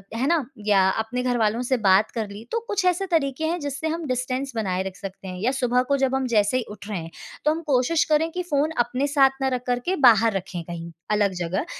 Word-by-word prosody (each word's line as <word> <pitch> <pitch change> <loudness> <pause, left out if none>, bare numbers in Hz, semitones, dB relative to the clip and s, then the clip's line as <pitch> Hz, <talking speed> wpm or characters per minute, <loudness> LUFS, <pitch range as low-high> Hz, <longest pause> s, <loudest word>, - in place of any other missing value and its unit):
है 250 +4 0
ना, 320 -5 +2 0.2
या 195 -3 +4
अपने 250 +3 -3
घरवालों 235 -2 +1
से 260 - +2
बात 190 +3 +5
कर 225 -3 -3
ली। 205 +2 -9
तो 465 - 0
कुछ 400 -4 0
ऐसे 365 +2 +2
तरीके 310 -1 +1
हैं 345 +2 -1
जिससे 285 +2 -3
हम 325 0 -3
डिस्टेंस 255 +2 -2
बनाए 190 -4 -1
रख 190 -1 -6
सकते 195 -1 -8
हैं। 180 -1 -6
या 240 +5 +2
सुबह 250 -2 +1
को 280 - +3
जब 265 -1 +1
हम 265 0 0
जैसे 210 +4 +3
ही 255 - -1
उठ 205 0 -10
रहे 200 -5 -2
हैं, 165 0 -8 0.3
तो 300 - +5
हम 325 +2 -2
कोशिश 275 +4 +3
करें 315 +2 +3
कि 360 +1 -3
फ़ोन 290 +2 +2
अपने 255 +4 -1
साथ 270 -2 +3
ना 265 - +2
रख 245 - -5
कर 245 0 +1
के 375 - +1
बाहर 225 -1 +5
रखे 180 -2 -6
कहीं 170 0 -7 0.2
अलग 205 -2 +2
जगह, 185 - -2
250 Hz, 245 wpm, -24 LUFS, 205-285 Hz, 0.3 s, बात